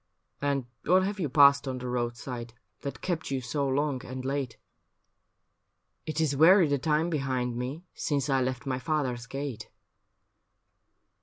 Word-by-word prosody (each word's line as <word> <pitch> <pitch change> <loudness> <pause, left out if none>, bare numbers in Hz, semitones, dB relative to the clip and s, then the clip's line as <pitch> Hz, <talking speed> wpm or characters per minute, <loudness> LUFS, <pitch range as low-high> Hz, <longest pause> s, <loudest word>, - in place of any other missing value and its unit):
' - - -43
And 135 -3 -1 0.2
what 185 +3 +4
have 200 +1 -2
you 160 -6 -1
passed 140 0 +6
on 130 -1 -2
the 125 0 -5
roadside 120 -1 -4 0.3
That 140 - -6
kept 170 -3 -2
you 135 -1 0
so 135 +3 -1
long 140 0 0
and 130 0 -6
late? 135 -3 -2 0.5
' - - -50
' - - -50
It 155 0 -2
is 155 -3 +1
weary 170 +4 +7
the 140 -1 +1
time 155 +4 +1
behind 130 -5 -1
me 130 +8 -4
Since 140 -2 -1
I 135 -2 +2
left 130 -1 -2
my 130 -2 -1
father's 130 -5 -1
gate. 135 -2 -5
140 Hz, 165 wpm, -28 LUFS, 125-150 Hz, 0.5 s, weary